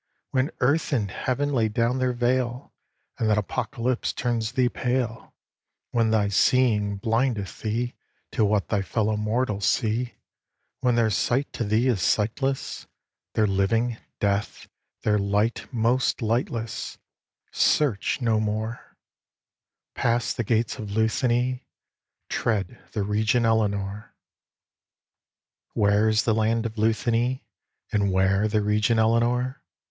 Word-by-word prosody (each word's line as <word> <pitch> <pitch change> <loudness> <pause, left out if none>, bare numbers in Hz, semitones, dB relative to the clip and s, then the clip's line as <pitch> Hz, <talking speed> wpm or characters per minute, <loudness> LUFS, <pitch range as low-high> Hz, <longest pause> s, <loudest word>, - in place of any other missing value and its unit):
When 130 +3 +1
earth 140 +7 +2
and 105 -7 0
heaven 140 +6 -1
lay 115 -4 +2
down 115 +4 0
their 130 -1 +1
veil, 125 +1 -1 0.5
And 110 - +1
that 105 - +3
apocalypse 120 +4 -1
turns 115 -2 -1
thee 125 -1 +3
pale; 120 -2 -2 0.6
When 115 -2 +2
thy 105 -2 +2
seeing 105 -2 +3
blindeth 115 -2 -1
thee 115 +3 -2 0.4
To - - +1
what 105 -1 +1
thy 105 -2 +1
fellow 110 +2 0
mortals 105 -1 0
see; 120 +1 0 0.6
When 125 -2 +2
their 115 -2 +2
sight 120 +7 0
to - - -2
thee 110 +3 +1
is 115 -8 +1
sightless; 130 +8 -1 0.5
Their 110 - +3
living, 110 +4 +1 0.2
death; 100 0 -1 0.4
their 105 -1 +2
light, 105 +6 0
most 120 +1 +1
lightless; 115 0 -2 0.5
Search 135 -2 +1
no 115 -3 +2
more 110 +2 -4 1.0
Pass 120 0 0
the 120 - -2
gates 115 +1 0
of 105 -2 -5
Luthany, 120 +4 0 0.6
tread 115 +1 -2
the 105 - -1
region 110 +4 +1
Elenore." 105 -2 -1 1.6
Where 105 0 +3
is 110 0 +2
the 110 - +2
land 110 +1 +1
of 115 - -3
Luthany, 115 +3 +1 0.5
And 100 -2 +1
where 95 +2 +2
the 105 -1 +1
region 105 +2 +2
Elenore? 120 +4 +1
115 Hz, 125 wpm, -25 LUFS, 105-125 Hz, 1.6 s, that